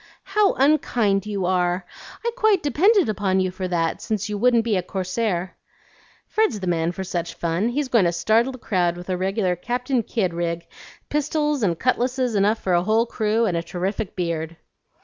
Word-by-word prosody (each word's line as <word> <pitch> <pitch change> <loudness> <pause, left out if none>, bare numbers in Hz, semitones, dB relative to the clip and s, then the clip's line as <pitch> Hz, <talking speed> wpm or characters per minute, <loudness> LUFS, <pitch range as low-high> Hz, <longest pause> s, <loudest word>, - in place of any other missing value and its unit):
"How 395 +1 +2
unkind 235 -8 +2
you 200 -3 -2
are! 180 0 +1 0.4
I 470 - +1
quite 435 -8 +3
depended 365 - +3
on 190 -2 +2
you 185 -1 0
for 185 0 -4
that, 165 -2 -1
since 210 -2 -2
you 210 - -2
wouldn't 235 +2 +3
be 225 -2 0
a 185 - +1
corsair." 185 0 -2 0.7
"Fred's 430 - +1
the 190 - -5
man 170 -1 0
for 190 +2 -5
such 175 -2 -4
fun. 170 +6 0
He's 280 +3 -1
going 230 -7 +3
to 170 - +2
startle 220 +9 +2
the - - -8
crowd 175 -7 0
with 180 +1 -6
a - - +1
regular 190 0 0
Captain 245 +6 -1
Kidd 200 -5 -1
rig, 170 0 -2 0.4
pistols 300 -1 0
and 175 -6 +1
cutlasses 255 +1 0
enough 205 +2 +2
for 190 -4 -1
a 175 - +4
whole 220 +5 +2
crew, 225 0 0
and 185 -5 0
a 170 - 0
terrific 185 +4 -4
beard." 165 -2 -3
200 Hz, 190 wpm, -23 LUFS, 180-245 Hz, 0.7 s, a